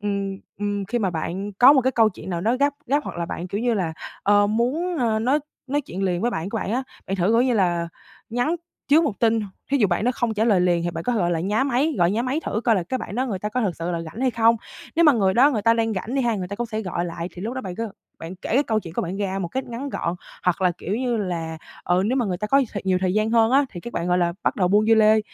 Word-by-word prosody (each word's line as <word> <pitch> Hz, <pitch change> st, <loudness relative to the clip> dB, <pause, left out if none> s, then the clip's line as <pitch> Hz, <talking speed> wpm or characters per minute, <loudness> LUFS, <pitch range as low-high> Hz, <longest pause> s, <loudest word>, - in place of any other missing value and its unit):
ừm, 200 Hz, -1 st, -2 dB, 0.2 s
ừm, 205 Hz, -1 st, -2 dB
khi 240 Hz, +5 st, -1 dB
mà 195 Hz, -4 st, 0 dB
bạn 180 Hz, +5 st, -4 dB
có 245 Hz, +8 st, +7 dB
một 270 Hz, -, +5 dB
cái 260 Hz, +2 st, +1 dB
câu 225 Hz, -2 st, +4 dB
chuyện 190 Hz, -, -9 dB
nào 170 Hz, -1 st, -2 dB
đó 225 Hz, +7 st, +1 dB
gấp 285 Hz, +1 st, +2 dB
gấp, 285 Hz, +3 st, +1 dB
hoặc -, -, -6 dB
là 170 Hz, 0 st, -2 dB
bạn 175 Hz, +2 st, -5 dB
kiểu 200 Hz, +4 st, -3 dB
như 240 Hz, -1 st, +1 dB
là, 175 Hz, -5 st, -1 dB, 0.3 s
ờ, 205 Hz, 0 st, +4 dB
muốn, 270 Hz, -, 0 dB
ờ, 225 Hz, -3 st, +1 dB
nói 255 Hz, +7 st, +2 dB, 0.3 s
nói 285 Hz, +2 st, 0 dB
chuyện 195 Hz, -8 st, -6 dB
liền 180 Hz, -2 st, 0 dB
với 240 Hz, -, +1 dB
bạn 170 Hz, -3 st, -3 dB
của 225 Hz, -, -2 dB
bạn 205 Hz, -, -3 dB
á, 255 Hz, -, 0 dB, 0.2 s
bạn 195 Hz, -, -2 dB
thử, 180 Hz, -2 st, +1 dB
kiểu 230 Hz, +3 st, +4 dB
như 255 Hz, -1 st, +2 dB
là, 175 Hz, -4 st, +1 dB, 0.4 s
nhắn 245 Hz, +9 st, 0 dB, 0.3 s
trước 310 Hz, +4 st, +5 dB
1 290 Hz, -, 0 dB
tin. 225 Hz, -1 st, +3 dB, 0.3 s
Thí 280 Hz, -, +3 dB
dụ 210 Hz, -, +4 dB
bạn 175 Hz, +3 st, 0 dB
đó 250 Hz, -, +3 dB
không 230 Hz, -2 st, -1 dB
trả 215 Hz, -, +1 dB
lời 205 Hz, -6 st, +4 dB
liền 175 Hz, -1 st, +2 dB
thì 175 Hz, -, -1 dB
bạn 165 Hz, 0 st, -6 dB
có 245 Hz, -, +1 dB
thể, 230 Hz, -, 0 dB
gọi 175 Hz, -3 st, +1 dB
là, 165 Hz, -2 st, 0 dB
nhá 210 Hz, +8 st, +1 dB
máy, 280 Hz, +4 st, +1 dB
gọi 175 Hz, +1 st, +4 dB
nhá 225 Hz, +4 st, 0 dB
máy 260 Hz, +5 st, -1 dB
thử 215 Hz, -, -1 dB
coi 230 Hz, -3 st, +4 dB
là 185 Hz, -, +1 dB
cái 255 Hz, +10 st, -3 dB
bạn 215 Hz, -, -6 dB
đó 255 Hz, +3 st, 0 dB
người 205 Hz, -7 st, -3 dB
ta 210 Hz, +3 st, -3 dB
có 250 Hz, +3 st, -1 dB
thực 190 Hz, -7 st, -1 dB
sự 170 Hz, +1 st, -3 dB
là 170 Hz, -1 st, -2 dB
rảnh 165 Hz, +9 st, -8 dB
hay 260 Hz, -, +2 dB
không. 230 Hz, 0 st, +4 dB, 0.4 s
Nếu 335 Hz, -, +5 dB
mà 300 Hz, -, +7 dB
người 195 Hz, -5 st, +2 dB
đó 265 Hz, +5 st, +6 dB
người 220 Hz, -7 st, -1 dB
ta 230 Hz, 0 st, +4 dB
đang 225 Hz, -1 st, 0 dB
rảnh 220 Hz, +6 st, -4 dB
đi 270 Hz, -, +1 dB
ha, 235 Hz, -2 st, +1 dB
người 180 Hz, -2 st, -4 dB
ta 200 Hz, -, -5 dB
cũng 240 Hz, -, -2 dB
sẽ 220 Hz, -1 st, -3 dB
gọi 175 Hz, -3 st, -2 dB
lại, 170 Hz, 0 st, -5 dB
thì 180 Hz, -, -8 dB
lúc 230 Hz, +4 st, -3 dB
đó 260 Hz, -, -3 dB
bạn 185 Hz, -5 st, -6 dB
cứ 230 Hz, 0 st, -3 dB, 0.3 s
bạn 170 Hz, +3 st, -8 dB
kể -, -, -7 dB
cái 275 Hz, -, +5 dB
câu 220 Hz, -5 st, 0 dB
chuyện 165 Hz, -5 st, -10 dB
của -, -, 0 dB
bạn 180 Hz, +3 st, -4 dB
ra 195 Hz, -1 st, -2 dB
một 175 Hz, -3 st, -3 dB
cách 265 Hz, +7 st, -3 dB
ngắn 240 Hz, +4 st, -5 dB
gọn. 170 Hz, -10 st, -2 dB, 0.3 s
Hoặc 180 Hz, +1 st, +1 dB
là 180 Hz, -1 st, +3 dB
kiểu 195 Hz, -, -3 dB
như 245 Hz, -1 st, 0 dB
là, 165 Hz, -6 st, -3 dB, 0.3 s
ừ, 180 Hz, +1 st, +2 dB
nếu 250 Hz, +4 st, +1 dB
mà 245 Hz, -, +1 dB
người 180 Hz, -2 st, -1 dB
ta 210 Hz, -, -2 dB
có 275 Hz, +5 st, +4 dB
nhiều 270 Hz, -, +2 dB
thời 200 Hz, -, -4 dB
nhiều 185 Hz, -1 st, +2 dB
thời 185 Hz, 0 st, 0 dB
gian 215 Hz, +1 st, +1 dB
hơn 225 Hz, -1 st, +4 dB
á, 275 Hz, +2 st, +5 dB
thì 175 Hz, -, -8 dB
các 240 Hz, -, -8 dB
bạn 170 Hz, +1 st, -2 dB
gọi 180 Hz, -, +3 dB
là, 170 Hz, -1 st, +1 dB
bắt -, -, 0 dB
đầu 180 Hz, -3 st, +2 dB
buôn 210 Hz, +3 st, +3 dB
dưa 225 Hz, -, +6 dB
lê. 220 Hz, 0 st, +5 dB
215 Hz, 320 wpm, -23 LUFS, 180-240 Hz, 0.4 s, có